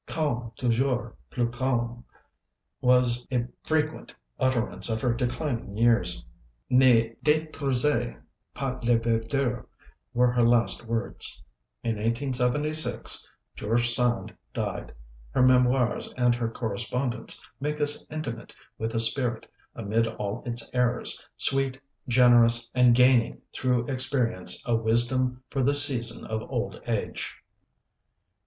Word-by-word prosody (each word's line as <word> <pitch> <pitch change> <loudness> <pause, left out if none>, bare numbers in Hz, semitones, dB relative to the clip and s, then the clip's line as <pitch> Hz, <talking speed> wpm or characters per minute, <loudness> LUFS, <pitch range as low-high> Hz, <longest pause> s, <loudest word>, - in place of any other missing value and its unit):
"Calme, 125 -7 -2
toujours 125 +1 0 0.2
plus 120 -1 -1
calme," 120 -2 -1 0.8
was 125 -1 +3
a 125 -2 +1 0.2
frequent 155 0 -2 0.2
utterance 130 -3 0
of 110 0 -1
her 120 +1 +1
declining 120 -3 -3
years. 115 - +2 0.5
"Ne 120 -3 +5
d├®truisez 150 -5 0 0.4
pas 130 -2 -4
la 120 0 +4
verdure" 115 +2 -1 0.5
were 125 0 +4
her 120 0 +1
latest 120 0 +2
words. 115 +1 -2 0.4
In 115 -2 -1
1876 130 +6 -1 0.3
George 120 +3 +1
Sand 120 0 0 0.2
died. - - -4 0.4
Her 125 - +2
memoirs 125 -1 +3
and 125 -1 +3
her 120 -1 -2
correspondence 120 +2 -3 0.2
make 150 +2 -3
us 145 0 +1
intimate 135 -7 -6 0.3
with 115 +1 -3
a - - +2
spirit, 120 0 0 0.3
amid 115 +1 0
all 105 0 -4
its 120 -1 -2
errors, 125 -1 0
sweet, 135 -1 +3 0.3
generous, 120 -1 +5
and 125 -2 +5
gaining 125 -1 +4
through 125 -2 0
experience 130 -6 -1
a 120 - +2
wisdom 125 +3 +2
for 135 - -1
the 140 +3 +2
season 135 -5 +2
of 110 0 -3
old - - -3
age. - - -3
120 Hz, 115 wpm, -27 LUFS, 115-130 Hz, 0.8 s, Ne